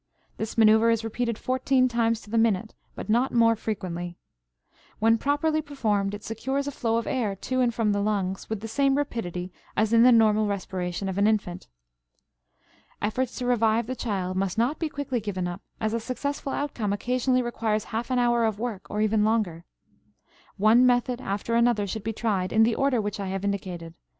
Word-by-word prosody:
This 220 +1 -5
maneuver 220 +1 +6
is 230 -1 +1
repeated 230 0 -2
fourteen 255 +1 +2
times 230 -2 0
to 210 - -14
the 230 - +1
minute, 220 -1 +1 0.2
but - - -7
not 240 +5 +2
more 230 -1 +4
frequently. 175 -5 -4 0.8
When 225 +1 +3
properly 310 +3 +1
performed 210 -9 -1
it 205 - -10
secures 265 +5 -2
a 285 - -3
flow 230 -4 0
of 230 - -2
air 225 -7 -1
to 255 +6 -2
and 245 -1 +3
from 225 -2 0
the 205 0 0
lungs 195 -2 -2
with 220 -2 -3
the 225 - -5
same 275 +4 +2
rapidity 185 -10 -3 0.2
as 220 +1 +2
in 230 - +6
the 250 +1 +7
normal 215 -2 +4
respiration 190 -2 -3
of 190 +1 -2
an 205 - +4
infant. 190 -5 -1 1.3
Efforts 240 +4 -1
to 250 - -3
revive 230 -2 +2
the 255 +3 -4
child 190 -6 -2
must 195 0 -1
not 245 +7 +1
be 320 - -1
quickly 275 -4 -3
given 190 -4 -3
up, 175 +3 -6 0.2
as 220 0 -1
a 230 - 0
successful 270 +4 -4
outcome 245 -8 -2
occasionally 250 +4 +1
requires 220 -3 -1
half 230 +3 -4
an 255 - +1
hour 240 -1 +3
of 220 -2 -1
work 220 -4 -5
or 210 - -2
even 215 0 +2
longer. 210 -7 0 0.9
One 215 +5 +5
method 245 0 +2
after 200 +3 -3
another 235 -3 +3
should 200 +2 -5
be 225 - -2
tried 200 -5 -1
in 220 0 +5
the 230 +1 +3
order 270 0 +1
which 205 -1 -3
I 200 - -3
have 195 +1 -3
indicated. 180 -4 -4
225 Hz, 195 wpm, -26 LUFS, 205-245 Hz, 1.3 s, the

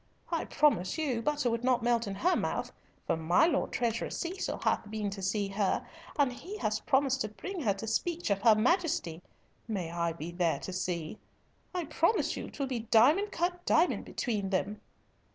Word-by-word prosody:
I 330 - 0
promise 190 - +2
you 270 -7 0
butter 290 -2 0
would 230 +1 -2
not 250 -2 +2
melt 235 -2 +2
in 195 - -3
her 360 - +2
mouth, - - -2 0.3
for - - +1
my 165 - +3
Lord 320 -4 +1
Treasurer 230 -1 -1
Cecil 365 +2 -3
hath 210 - +1
been 210 -2 -2
to 195 0 -6
see 200 +1 0
her, 195 -1 0 0.3
and 280 -4 +3
he 385 +11 -8
has 215 - -1
promised 270 -1 +2
to - - 0
bring 365 - -6
her 205 -8 +1
to 200 - -6
speech 325 +6 -1
of 195 -1 +1
her 220 -1 +7
Majesty. 235 - +1 0.5
May 185 -7 -3
I 170 -1 -1
be 165 +1 -6
there 175 -2 +1
to 185 - -5
see. 175 -1 -3 0.6
I 355 -2 -1
promise 335 +8 +1
you - - -6
'twill 280 - -3
be 255 -3 -2
diamond 255 - +4
cut 350 +1 -1
diamond 340 +3 +2
between 210 -6 -2
them." 205 +2 -1
230 Hz, 190 wpm, -31 LUFS, 195-300 Hz, 0.6 s, her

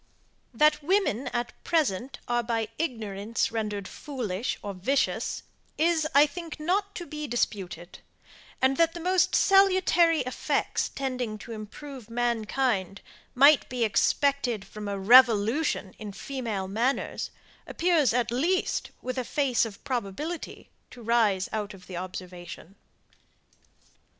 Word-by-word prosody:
That 300 +5 +3
women 320 - +1
at 240 0 -3
present 275 - 0
are 240 0 +1
by 225 -2 -2
ignorance 225 -6 -2
rendered 210 -3 -3
foolish 240 -7 -4
or 200 - -4
vicious, 205 +10 -1 0.3
is, 320 -1 +2
I 285 +1 +8
think, 325 +1 -7
not 395 +6 -1
to 345 - -5
be 300 -2 -6
disputed; 195 -6 -3 0.6
and, 265 +1 +3
that 330 0 +3
the - - -5
most 365 +2 +2
salutary 370 -4 +4
effects 255 0 -1
tending 255 -5 -3
to 220 - -10
improve 230 +3 -9
mankind, 230 -4 -1 0.3
might 280 +3 +6
be 245 -2 -1
expected 245 0 +1
from 210 -1 -8
a 200 0 -2
REVOLUTION 225 +1 +4
in 210 -2 -7
female 220 -4 -4
manners, 235 +7 -1 0.4
appears 335 -7 +2
at 240 -1 0
least, 335 +10 0
with 255 +1 -3
a - - -1
face 255 -2 +1
of 210 -3 -9
probability, 260 - -4 0.2
to 245 - -12
rise 215 -5 +2
out 210 -2 -3
of 180 -1 -16
the 180 - -7
observation. 180 -1 -8
245 Hz, 125 wpm, -27 LUFS, 210-295 Hz, 0.6 s, I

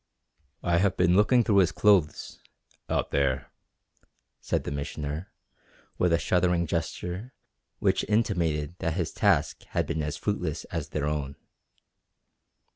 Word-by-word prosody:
"I 85 -1 +2
have 100 +1 +1
been 90 0 +4
looking 115 +5 +5
through 105 -2 +2
his 90 -2 +4
clothes 100 -6 +2 0.5
out - - -1
there," 70 -2 0 0.9
said - - -1
the - - -4
Missioner, 75 +3 -4 0.7
with 90 - +3
a 85 - +4
shuddering 90 0 +1
gesture 90 +7 -4 0.4
which - - +1
intimated 85 -9 +1
that 80 -1 -1
his 85 -4 -1
task - - +1 0.2
had - - +2
been 80 - -2
as 75 0 -3
fruitless 90 -7 -2
as - - -3
their 75 -1 -2
own. 75 -2 -2
85 Hz, 130 wpm, -27 LUFS, 75-95 Hz, 0.9 s, looking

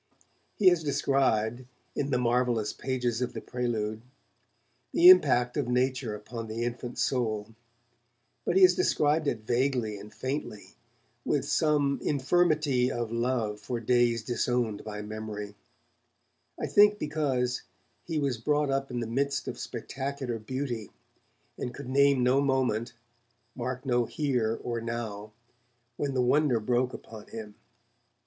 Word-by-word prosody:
He 195 -3 +6
has 175 -3 +1
described, 130 -5 +1 0.3
in 140 - -1
the 130 - +2
marvellous 120 -2 +1
pages 125 -3 -2
of 125 - -2
the - - -4
'Prelude', 110 -3 -3 0.9
the 350 +2 +8
impact 125 - +5
of 140 -4 0
nature 125 -2 0
upon 115 +2 -7
the 110 +2 -3
infant 120 +1 -4
soul, 110 -4 -1 0.9
but 175 - 0
he 190 - +6
has 180 -1 +8
described 150 -2 +2
it 115 -5 -1
vaguely 120 -3 0
and 105 +1 -11
faintly, 130 -5 -5 0.5
with - - 0
some 145 -3 +2
'infirmity 145 -3 +2
of 120 -3 -3
love 115 -3 -1
for 115 +4 -4
days 120 -1 +2
disowned 120 -2 -1
by 105 -1 -6
memory', 105 -1 -6 1.1
I - - -1
think 205 0 +5
because 140 -7 -1 0.4
he 165 -2 -3
was 140 -5 0
brought 145 +3 +1
up 135 0 -1
in 120 -1 -3
the - - -2
midst 140 +5 -1
of - - -5
spectacular 135 -3 -4
beauty, 120 -1 -4 0.7
and 125 - -4
could 140 -3 -8
name 140 -1 +4
no 130 +3 +4
moment, 130 -4 0 0.6
mark 130 +2 -4
no 120 -2 +2
'here' 125 -6 -1
or 120 -1 -3
'now', 110 -3 -5 0.6
when 140 0 -2
the 125 - +2
wonder 135 -1 +3
broke 125 +3 +1
upon 110 -1 -10
him. 110 -2 -8
125 Hz, 140 wpm, -28 LUFS, 115-140 Hz, 1.1 s, the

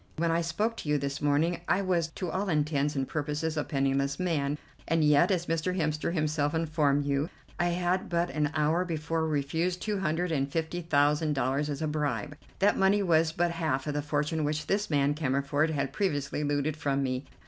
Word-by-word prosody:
When 165 +1 +1
I 165 +1 +2
spoke 210 +8 -1
to 150 - -5
you 150 - +3
this 140 0 -3
morning 155 +4 +1
I 195 - +2
was 175 -3 +1
to 180 -3 -3
all 195 +1 -1
intents 150 -2 +1
and 135 -1 -1
purposes 150 +1 -2
a 150 - 0
penniless 140 +1 0
man, 150 -5 0 0.3
and 165 0 +2
yet, 150 +3 +5
as 180 -3 +1
Mr. 165 +3 -1
Hemster 155 0 0
himself 155 -2 0
informed 150 -3 +1
you, 140 +3 0 0.3
I 175 - +2
had 175 +2 0
but 170 -1 0
an 150 +1 0
hour 155 +3 +2
before 160 -1 -2
refused 160 +5 -1
two 210 +1 -2
hundred 175 0 0
and 140 -2 0
fifty 165 +2 -2
thousand 150 -1 +2
dollars 135 +2 0
as 145 +1 -3
a - - 0
bribe. 145 -4 -2 0.2
That 205 +1 +3
money 195 +1 +4
was 165 -3 +3
but 170 +1 0
half 160 -6 -1
of 150 - -2
the 145 - -1
fortune 150 +2 -1
which 150 +1 -1
this 205 +4 0
man 145 -1 +2
Cammerford 145 +1 0
had 145 -3 -2
previously 150 -7 -1
looted 145 +1 0
from 140 -3 0
me. 130 0 -2
155 Hz, 200 wpm, -29 LUFS, 145-170 Hz, 0.3 s, yet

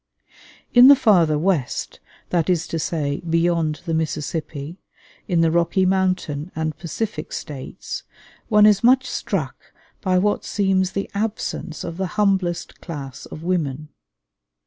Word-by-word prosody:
In 245 +1 +9
the 285 - +10
farther 175 - +4
West, 160 -5 -1 0.3
that 170 -1 +1
is 175 -2 +2
to 165 - -2
say, 145 -3 -2
beyond 165 -2 0
the 165 - -2
Mississippi, 155 0 -3 0.5
in 175 -4 +2
the 165 -1 +3
Rocky 170 +3 +2
Mountain 185 -4 0
and 155 -1 -2
Pacific 170 +1 -4
States, 145 +4 -6 0.5
one 210 -2 +6
is 210 -1 +5
much 260 +2 +5
struck - - -4 0.3
by 185 -2 +2
what 205 +3 +1
seems 190 -2 +1
the 195 - -2
absence 205 -5 -3
of 170 0 -6
the 190 0 -1
humblest 190 -4 0
class 140 -5 -7
of 155 - -9
women. 155 -5 -2
175 Hz, 135 wpm, -22 LUFS, 155-195 Hz, 0.5 s, the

